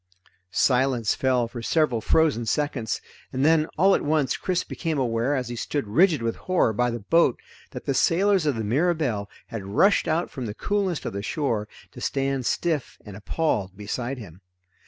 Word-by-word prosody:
Silence 125 +1 +2
fell 125 -3 +1
for 120 0 -7
several 125 -3 +1
frozen 150 -2 +2
seconds, 125 -3 -1 0.3
and 130 +2 0
then 160 0 +4
all 195 +4 +5
at - - +2
once 145 -3 +1
Chris 180 -1 -1
became 160 -3 -3
aware 120 +1 0
as 130 -3 -2
he 120 - -4
stood 140 +3 -2
rigid 155 - +3
with 115 0 -1
horror 185 -11 +1
by 125 +3 +1
the 120 -1 -4
boat 165 +3 +3 0.3
that - - -8
the 140 - 0
sailors 180 +5 +3
of 145 - +1
the 110 - -3
Mirabelle 130 - 0 0.2
had 115 -4 -5
rushed 110 - +3
out 165 +2 0
from 125 -3 -5
the 105 - -6
coolness 200 -5 -1
of - - -3
the 100 - -3
shore 115 -3 -1 0.2
to - - -11
stand 135 -2 -1
stiff 160 -6 -1
and 105 -2 -9
appalled 100 - -2
beside 120 +5 -4
him. 95 -6 -11
130 Hz, 180 wpm, -25 LUFS, 115-160 Hz, 0.3 s, all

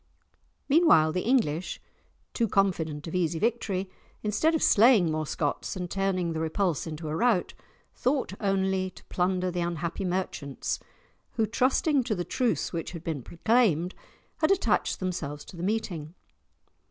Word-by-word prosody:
Meanwhile, 280 - +5
the 180 - -1
English, 185 - 0 0.5
too 230 - +1
confident 165 -7 0
of 165 - -6
easy 170 -2 0
victory, 200 -2 -1 0.4
instead 220 +11 +2
of 320 - 0
slaying 215 -6 +6
more 155 -1 -2
Scots 145 +6 -2
and 180 -2 -5
turning 185 -3 0
the 160 - -3
repulse 165 0 0
into 155 0 -6
a 150 - -2
rout, 220 -2 +2 0.4
thought 260 -5 0
only 190 -1 +1
to - - -17
plunder 180 0 0
the 175 0 -2
unhappy 170 +2 -2
merchants, 175 -7 -2 0.5
who, 225 - +1
trusting 260 +5 +2
to 225 -4 0
the 175 -2 -3
truce 245 - 0
which 165 +1 -4
had 170 -2 -7
been 160 -5 -3
proclaimed, 180 - +2 0.4
had 310 - +2
attached 390 -1 +1
themselves 155 -6 -4
to - - -12
the 170 - -7
meeting. 180 -6 -2
185 Hz, 150 wpm, -28 LUFS, 165-220 Hz, 0.5 s, slaying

